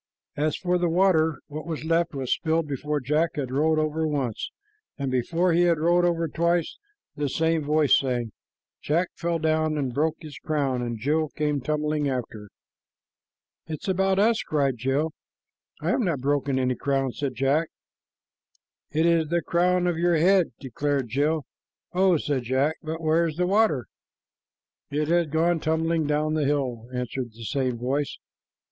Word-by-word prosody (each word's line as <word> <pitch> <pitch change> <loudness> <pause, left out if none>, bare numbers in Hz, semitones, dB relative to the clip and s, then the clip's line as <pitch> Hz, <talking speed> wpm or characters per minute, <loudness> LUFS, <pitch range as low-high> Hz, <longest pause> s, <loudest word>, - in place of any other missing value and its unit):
As 150 +1 0
for 180 -1 0
the 175 -1 +1
water, 160 -4 +3
what 155 +2 -7
was 160 -2 -4
left 165 -1 +1
was 130 -2 0
spilled 160 0 0
before 145 +1 -2
Jack 150 +5 0
had 135 -4 -3
rolled 155 +4 +2
over 155 +1 0
once; 135 -7 -2 0.5
and 140 -3 -2
before 165 +8 +1
he 170 - +4
had 170 -1 +3
rolled 175 +3 +3
over 170 -1 +1
twice, 170 +1 0 0.4
the 145 -1 -1
same 160 +2 +1
voice 150 0 +4
sang, 120 -4 -2 0.5
"Jack 170 +4 +1
fell 170 -1 -1
down 155 -1 +1
And 135 -4 -2
broke 155 +3 +1
his 150 -4 -9
crown, 140 -5 -1
And 120 -1 -3
Jill 150 +6 0
came 150 -2 -1
tumbling 150 +1 0
after." 110 -5 -5 1.2
"It 155 -2 -6
is - - -6
about 190 0 +2
us," 220 +3 +3
cried 140 -4 0
Jill. 135 +6 0 0.7
"I - - 0
have - - +1
not 170 - 0
broken 140 0 0
any 130 -1 +1
crown," 135 0 -1
said 135 0 -4
Jack. 140 +6 +1 1.2
"It 160 +2 +1
is 165 -2 +3
the 170 +2 0
crown 180 +1 +2
of 175 -2 0
your 175 0 +3
head," 185 +2 +4
declared 135 0 -2
Jill. 145 +5 0 0.5
"Oh!" 185 -1 +4
said 145 -3 -1
Jack; 130 +6 0
"but 160 +1 -5
where's 160 0 +2
the 180 - +2
water?" 195 - +2 1.0
"It 150 +1 -1
has 170 -1 +3
gone 165 +3 +1
tumbling 160 0 0
down 150 +1 0
the 155 -2 +1
hill," 130 -5 -1
answered 125 -1 -4
the 115 +1 -11
same 130 -1 -1
voice. 135 +4 -2
155 Hz, 165 wpm, -25 LUFS, 135-165 Hz, 1.2 s, he